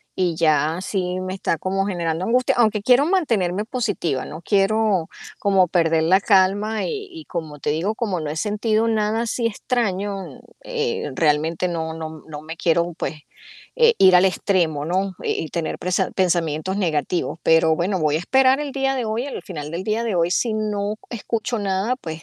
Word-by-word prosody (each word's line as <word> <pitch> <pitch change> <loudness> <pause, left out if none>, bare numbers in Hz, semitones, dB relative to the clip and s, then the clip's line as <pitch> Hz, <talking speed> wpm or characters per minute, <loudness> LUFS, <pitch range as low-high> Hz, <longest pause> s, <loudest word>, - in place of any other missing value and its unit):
y 180 -3 0
ya 155 0 +2
sí 185 -2 -2
me 185 0 -4
está 185 -3 -1
como 195 +4 -1
generando 170 -2 -2
angustia, 250 +2 +2
aunque 215 -3 +2
quiero 255 +5 +4
mantenerme 215 - +1
positiva, 205 - -2
no 155 +3 -9
quiero 200 -2 +2 0.3
como 195 -2 +3
perder 165 -2 +2
la 185 +4 +4
calma 205 +2 +2
y 420 -4 -4
y 325 -3 -10
como 160 -4 -6
te 145 - -2
digo, 175 +8 -1
como 200 -7 -2
no 155 - -4
he 150 - -4
sentido 215 +4 0
nada 220 0 +1
así 235 0 -1
extraño, 205 -4 -1 0.5
eh, 460 -1 -2
realmente 160 +3 +1
no 160 -2 -3
no 160 -1 -5
m - - -17
no 150 -2 -8
me 160 +1 -8
quiero, 170 +1 +1
pues, 160 - -4 0.6
eh, 470 -1 +6
ir 185 -1 +7
al 180 - +5
extremo, 175 -5 +1
¿no? 190 +3 0
Y - - -1
y - - -7
tener 170 -2 -3
prese 180 +1 0
pensamientos 175 0 0
negativos, 170 -1 -1
pero 160 -1 +4
bueno, 185 +3 0
voy 150 -1 +2
a - - +1
esperar 265 - +3
el 290 -2 -4
día 270 0 0
de 255 -3 -2
hoy, 225 +4 -2
el 285 - -6
final 150 -5 -7
del 170 +3 -4
día 220 +3 -1
de 225 -4 -1
hoy 170 0 +2
si 220 +4 +1
no 210 -1 -1 0.2
escucho 235 0 -3
nada 200 +4 0
pues, 160 -9 -7
190 Hz, 190 wpm, -22 LUFS, 165-220 Hz, 0.6 s, ir